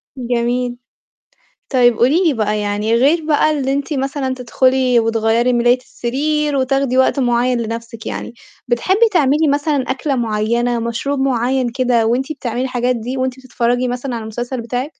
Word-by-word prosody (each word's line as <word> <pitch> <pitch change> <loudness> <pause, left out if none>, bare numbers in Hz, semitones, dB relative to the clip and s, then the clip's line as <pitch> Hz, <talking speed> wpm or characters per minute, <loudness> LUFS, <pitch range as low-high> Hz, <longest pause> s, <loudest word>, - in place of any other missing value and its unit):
جميل. 245 0 -1 1.0
طيب 245 -3 +4
قولي 300 +10 +3
لي 320 - +3
بقى 215 -1 0
يعني 210 +2 -1
غير 295 +7 +3
بقى 310 0 +3
اللي 275 -3 -1
أنتِ 280 +3 -2
مثلًا 270 -1 -2
تدخُلي 255 0 +2
وتغيّري 225 +2 +1
مِلاية 240 +1 +3
السرير 290 +4 -2
وتاخدي 265 0 +1
وقت 260 +2 +3
معيّن 245 0 +1
لنَفْسِك 230 0 -6
يعني، 235 - -5 0.3
بتحبّي 380 - +2
تعملي 300 -1 +3
مثلًا 285 -1 0
أكلة 270 +1 -1
معيّنة، 235 +1 0
مشروب 235 +5 -2
معيّن 255 -1 +1
كده 245 -2 +1
وأنت 260 +6 0
بتعملي 245 -3 -4
الحاجات 250 -1 0
دي 245 +4 -5
وأنتِ 260 0 -2
بتتفرّجي 245 -1 -1
مثلًا 245 +1 -4
على 230 - -4
المسلسل 240 +3 -5
بتاعِك؟ 245 +3 -3
250 Hz, 150 wpm, -17 LUFS, 235-270 Hz, 1.0 s, طيب